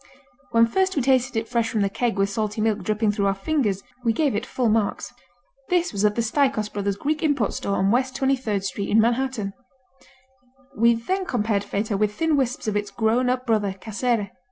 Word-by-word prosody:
When 230 -1 +5
first 380 +11 0
we 280 - +1
tasted 255 -2 +2
it 225 0 -1
fresh 235 -1 0
from 215 - 0
the 200 - +2
keg 230 +2 -1
with 195 0 +1
salty 215 +1 -2
milk 215 -1 +1
dripping 215 +2 0
through 200 -1 0
our 195 - +1
fingers, 205 -4 -1 0.2
we 230 -2 +2
gave 290 0 +1
it 220 +5 -2
full 250 -2 0
marks. 215 -1 0 0.6
This 355 -4 +1
was 200 0 -1
at 210 0 +3
the 235 - 0
Staikos 250 -3 0
Brothers 200 -1 -1
Greek 300 +9 -2
import 285 -9 +1
store 200 - -2
on 195 +1 +2
West 255 +2 +1
23rd 255 -7 0
Street 200 +1 -3
in 220 - +4
Manhattan. 235 -3 0 1.2
We 235 +2 +4
then 375 +12 -2
compared 210 -4 0
Feta 205 0 -2
with 210 0 0
thin 325 -2 +1
wisps 260 -1 -1
of 215 - 0
its 205 0 -1
grown 230 +4 +1
up 255 0 -1
brother, 210 -5 +1
Casere. 220 -1 -1
225 Hz, 205 wpm, -24 LUFS, 205-255 Hz, 1.2 s, When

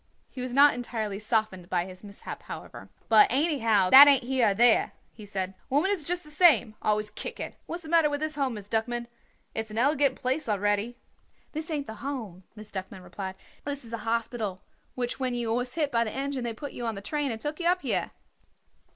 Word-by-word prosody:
He 255 - -7
was 250 0 -4
not 280 +3 +6
entirely 220 -5 -4
softened 215 -5 -1
by 175 -2 0
his 185 +1 -12
mishap, 200 -1 -9
however. - - -9 0.2
"But, 220 -2 +7
anyhow, 230 - +2
that 280 +2 +12
ain't 275 -3 +5
here 255 -1 +2
or 200 - +3
there," 235 +2 +4 0.2
he 215 -2 -12
said. 190 -2 -3 0.2
"Women 295 +9 +2
is 380 -6 +2
just 355 +3 -1
the 300 - -7
same 295 - +5
always 210 0 +1
kicking. - - -6
What - - -4
is 350 - -6
the 315 - -9
matter 330 -2 +4
with 290 0 -2
this 310 0 +1
Home, 270 -5 -1
Miss 205 -2 -8
Duckman? 235 +2 -1 0.5
It's 220 0 -4
an 215 - -7
elegant 275 +1 +3
place 260 +1 -2
already." 205 +3 0 0.5
"This 315 +2 -5
ain't 295 -3 -2
the 220 -3 -9
Home," 225 -10 -5
Miss 215 -1 -11
Duckman 190 -1 -7
explained. 190 +1 -6 0.3
"This 285 -3 -5
is 230 - -10
a 230 - -3
hospital, 225 -3 -3 0.3
which 245 0 -3
when 255 -2 -1
you 235 -2 -1
was 245 +1 -2
hit 300 -4 0
by 230 -1 +2
the 215 - -4
engine 270 -1 -3
they 235 - -2
put 280 +5 -7
you 240 - -5
on 225 - -2
the 195 - -7
train 295 +6 -2
and 225 -2 -4
took 295 +7 -4
you 340 - 0
up 360 +1 +2
here." - - -1
240 Hz, 220 wpm, -27 LUFS, 215-285 Hz, 0.5 s, that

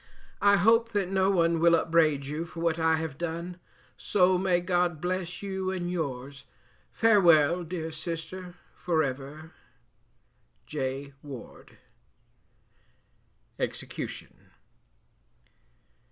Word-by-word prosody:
I 200 0 +5
hope 225 +3 +3
that 200 -3 0
no 190 0 +2
one 170 -3 +2
will 170 +1 +5
upbraid 160 -4 +2
you 150 +4 -3
for 165 0 -10
what 165 -1 +1
I 160 0 +3
have 160 -3 -5
done; 170 +1 -4 0.4
so 185 -2 +3
may 180 -1 +2
God 175 -2 0
bless 180 +2 -3
you 190 -1 -2
and 180 -2 -3
yours; 140 -4 -4 0.5
farewell! 175 -7 +4
dear 165 -1 -5
sister 170 +3 -6 0.2
for 165 -3 0
ever. 140 +4 -6 1.1
J 140 -1 -4
WARDE 135 -5 -11 1.8
EXECUTION. - - -6
170 Hz, 105 wpm, -28 LUFS, 155-185 Hz, 1.8 s, I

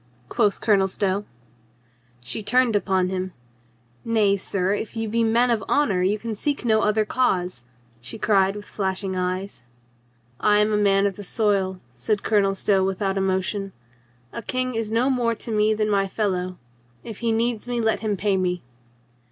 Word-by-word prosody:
quoth 205 - +1
Colonel 200 -3 +3
Stow. 195 +1 -1 1.0
She 175 - -4
turned 245 +1 +2
upon 190 -2 +1
him. 185 -1 -3 0.7
"Nay, 215 -3 +2
sir, 190 0 -1
if 210 +2 -4
you 225 0 -1
be 230 +2 +1
men 235 +2 +3
of 220 -4 0
honor 220 -11 +2
you 195 +3 +2
can 225 +1 -5
seek 280 +5 -2
no 220 -2 +3
other 215 0 +2
cause," 180 - 0 0.3
she 120 +1 -7
cried 195 -2 +2
with 205 0 -8
flashing 190 -1 -3
eyes. 185 -3 -3 0.8
"I 210 0 +4
am 210 +1 +3
a - - +3
man 200 -1 +3
of 195 -2 -1
the 205 - -7
soil," 195 -2 0
said 125 - -2
Colonel 200 -2 +2
Stow 195 -1 +2
with 190 0 -1
out 195 0 0
emotion. 195 +1 -1 0.6
"A 235 - -4
king 255 +3 -1
is 225 -1 -2
no 235 +3 +2
more 240 -3 +1
to 225 - -7
me 215 0 +2
than 215 0 0
my 200 -2 +1
fel 210 +1 -1
low. 180 0 -3 0.5
If 220 -3 -8
he 235 -1 0
needs 230 0 0
me, 245 -1 -1
let 220 -1 +1
him 210 -2 -1
pay 200 0 +1
me." 180 -1 -1
205 Hz, 180 wpm, -23 LUFS, 190-225 Hz, 1.0 s, I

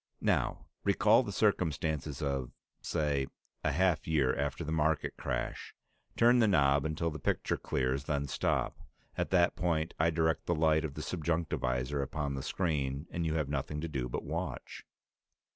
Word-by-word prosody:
"Now - - +1 0.2
recall 110 +3 +5
the 105 - -4
circumstances 80 - 0
of, 70 -3 -1 0.3
say, 70 -3 0 0.4
a 75 - +2
half 90 0 +2
year 70 -5 +2
after - - -2
the 80 - -4
market 80 -1 +1
crash. 60 0 -4 0.4
Turn 120 +1 +6
the 115 - +5
knob 70 -6 +4
until 80 +1 -1
the 75 - -6
picture - - 0
clears, 65 +2 -1
then 70 -1 -1
stop. - - 0 0.4
At - - -1
that 90 -2 +3
point 85 -2 0
I 80 +1 +4
direct 80 0 0
the 85 - +2
light 80 0 +3
of 75 -3 -4
the 75 - -5
subjunctivisor 75 -6 -1
upon 70 +1 -2
the 70 - -3
screen, 70 -4 -1
and 85 -1 -1
you 80 - 0
have 75 -3 0
nothing 75 +1 -2
to 85 - -2
do 65 -5 -3
but - - -3
watch." - - -5
75 Hz, 165 wpm, -32 LUFS, 70-85 Hz, 0.4 s, Turn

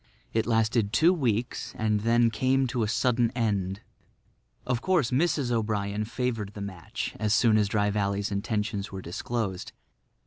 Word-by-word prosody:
It 110 0 +1
lasted 110 -2 +2
two 165 +9 +5
weeks 120 - -1
and 110 -1 +1
then 115 +2 +3
came 130 +4 +2
to 125 -1 -2
a 110 - +1
sudden 120 +1 +2
end. 100 -5 -1 0.8
Of 125 -2 -1
course 175 -10 +2
Mrs. 140 -2 +1
O'Brien 105 -2 -1
favoured 115 -3 -3
the - - -7
match 100 +1 -5
as 110 -1 +2
soon 115 -2 +4
as 105 -1 +3
Dry 105 0 +1
Valley's 100 0 -1
intentions 105 0 -2
were 95 -1 -6
disclosed. 95 +1 -4
110 Hz, 150 wpm, -27 LUFS, 100-120 Hz, 0.8 s, two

